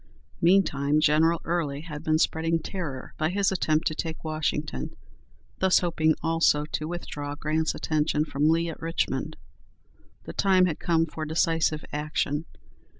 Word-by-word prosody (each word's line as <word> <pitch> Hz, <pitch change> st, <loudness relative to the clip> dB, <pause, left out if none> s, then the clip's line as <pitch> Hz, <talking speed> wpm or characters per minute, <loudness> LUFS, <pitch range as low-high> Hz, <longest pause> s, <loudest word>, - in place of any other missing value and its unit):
Meantime 155 Hz, -5 st, +3 dB
General 160 Hz, +2 st, +3 dB
Early 155 Hz, -5 st, -1 dB
had 155 Hz, -2 st, -8 dB
been 155 Hz, -1 st, +2 dB
spreading 165 Hz, +1 st, +1 dB
terror 160 Hz, -6 st, -6 dB
by 155 Hz, 0 st, +1 dB
his 195 Hz, +2 st, +1 dB
attempt 160 Hz, -3 st, +1 dB
to -, -, +1 dB
take 160 Hz, +1 st, -5 dB
Washington, 155 Hz, -, -2 dB, 0.6 s
thus 190 Hz, -1 st, +4 dB
hoping 160 Hz, -3 st, +2 dB
also 165 Hz, -2 st, +3 dB
to 155 Hz, 0 st, -4 dB
withdraw 145 Hz, -4 st, -5 dB
Grant's 155 Hz, +1 st, -1 dB
attention 155 Hz, -1 st, 0 dB
from 150 Hz, 0 st, +1 dB
Lee 165 Hz, +1 st, +2 dB
at 160 Hz, -, -8 dB
Richmond. 165 Hz, +1 st, -2 dB, 0.9 s
The -, -, -8 dB
time 190 Hz, -2 st, +4 dB
had 165 Hz, -4 st, -2 dB
come 165 Hz, -1 st, +2 dB
for 155 Hz, 0 st, -6 dB
decisive 160 Hz, -1 st, +1 dB
action. 150 Hz, 0 st, -1 dB
160 Hz, 145 wpm, -26 LUFS, 150-165 Hz, 0.9 s, thus